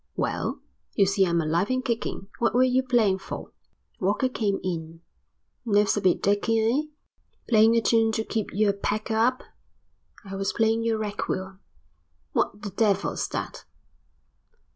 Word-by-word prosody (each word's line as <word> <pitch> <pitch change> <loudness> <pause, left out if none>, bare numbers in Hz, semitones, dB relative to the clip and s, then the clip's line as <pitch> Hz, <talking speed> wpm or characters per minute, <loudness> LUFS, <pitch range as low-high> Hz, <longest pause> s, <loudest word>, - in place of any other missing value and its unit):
"Well, - - -2 0.4
you 200 - +4
see 195 0 +2
I'm 170 0 +1
alive 165 +5 0
and 255 0 -1
kicking. 230 -5 -3
What 235 - +1
were 250 - +5
you 255 0 +3
playing 235 -7 +2
for?" - - -7 0.5
Walker 205 +7 +1
came 205 -5 -1
in. 165 -2 -5 0.6
"Nerves 210 -3 +3
a 210 - -1
bit 185 -3 +2
dicky, 205 +3 +2
eh? 230 +6 +2 0.7
Playing 225 0 +5
a 230 - +3
tune 225 0 +3
to 220 - 0
keep 220 -2 -3
your 205 0 +2
pecker 215 +2 -2
up?" 245 +3 +2 0.8
"I 195 0 -7
was 195 0 -2
playing 225 0 +2
your 230 -1 +1
requiem." 190 -3 -4 0.7
"What 205 - -1
the 205 - -4
devil's 200 -1 0
that?" - - -5
210 Hz, 150 wpm, -26 LUFS, 195-230 Hz, 0.8 s, were